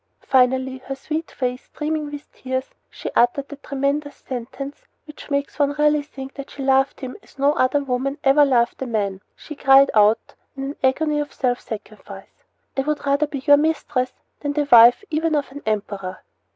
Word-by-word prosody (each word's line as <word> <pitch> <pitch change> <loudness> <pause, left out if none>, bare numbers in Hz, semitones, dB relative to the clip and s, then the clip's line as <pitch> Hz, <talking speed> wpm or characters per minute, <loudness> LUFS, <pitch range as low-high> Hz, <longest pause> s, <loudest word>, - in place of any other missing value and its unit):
Finally, 260 0 +2
her 270 +1 -6
sweet 310 +4 -4
face 250 -1 -3
streaming 305 -1 -3
with 290 0 -9
tears, 260 0 -4 0.2
she - - -7
uttered 260 +3 +3
that 285 0 -10
tremendous 280 +1 -2
sentence 265 +3 -7 0.2
which 300 -1 -12
makes 280 +1 -2
one 285 0 +2
really 300 0 +3
think 270 -2 -9
that 275 -1 -8
she 275 - -7
loved 270 0 +2
him 260 -1 -6
as - - -22
no 280 +2 +3
other 285 -1 +2
woman 270 +2 -2
ever 275 +2 +6
loved 250 -4 +2
a 265 - -2
man. 200 -4 -2
She - - -10
cried 275 0 +6
out, 215 +1 +3 0.2
in 270 - -4
an 275 +2 -4
agony 295 +3 +2
of 295 0 -3
self 245 -1 -1
sacrifice: 215 -1 -10 0.3
"I 270 - +1
would 300 +1 -2
rather 280 +2 +2
be 275 -2 -6
your 290 -1 +7
mistress 290 -4 0 0.3
than 290 -1 -2
the 290 -1 0
wife 240 - +8
even 315 0 +1
of 285 -2 -1
an 285 +1 -9
emperor!" 200 -3 -3
275 Hz, 185 wpm, -22 LUFS, 255-290 Hz, 0.3 s, wife